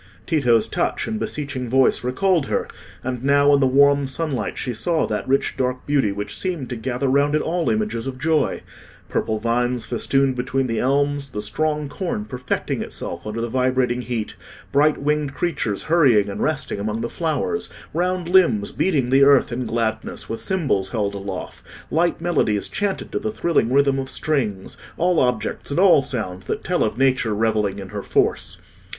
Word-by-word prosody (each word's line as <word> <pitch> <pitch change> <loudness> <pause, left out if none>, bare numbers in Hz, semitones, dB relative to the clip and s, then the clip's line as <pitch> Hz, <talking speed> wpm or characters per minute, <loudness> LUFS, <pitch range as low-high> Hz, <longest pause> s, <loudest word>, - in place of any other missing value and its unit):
Tito's 120 -9 +3
touch 175 - -1
and 220 -1 -2
beseeching 140 - -4
voice 130 0 +3
recalled 160 +5 +1
her; - - -1 0.4
and 125 -1 -4
now 140 +1 +4
in 140 - +5
the 135 - +4
warm 140 +1 +4
sunlight 135 -5 -3
she 125 - -3
saw 155 +9 0
that 105 - -3
rich 135 +1 +1
dark 125 0 -2
beauty 140 -8 +2
which 100 +1 -5
seemed 170 -6 -3
to 125 - -3
gather 125 +3 -2
round 140 +3 +3
it 155 - +2
all 170 0 0
images 210 - -1
of 130 -1 -5
joy—purple 150 -6 -2
vines 120 +2 0
festooned 135 +2 +1
between 125 +2 -1
the 115 -3 -1
elms, 140 +1 +1
the 105 - -5
strong 150 +7 -1
corn 140 - -3
perfecting 125 +3 -3
itself - - -6
under 105 +2 -4
the 115 - -1
vibrating 125 0 +1
heat, 120 -3 -3 0.4
bright 150 +2 +3
winged 145 -1 -1
creatures 140 - -2
hurrying 130 -12 +4
and 100 - -5
resting 150 -8 -1
among 110 +2 -2
the 115 - -1
flowers, 165 - -2 0.2
round 180 +1 -1
limbs 165 - +3
beating 140 -9 0
the 135 +1 +6
earth 140 -2 +5
in 120 0 -3
gladness 110 -1 -2
with 115 - -5
cymbals 140 - 0
held 105 -4 -1
aloft, 100 -2 -6 0.3
light 170 +2 +1
melodies 110 -12 +1
chanted 205 -2 -2
to - - -1
the 215 - -3
thrilling 170 - +1
rhythm 140 0 +3
of 135 0 -4
strings—all 145 - -1
objects 125 -4 -1
and 140 - -1
all 185 -6 +6
sounds 95 -9 -4
that - - -3
tell - - +1
of - - -2
Nature 130 -5 +2
revelling 105 -2 0
in 95 -2 -7
her 105 0 -5
force. - - 0
130 Hz, 175 wpm, -22 LUFS, 115-150 Hz, 0.4 s, the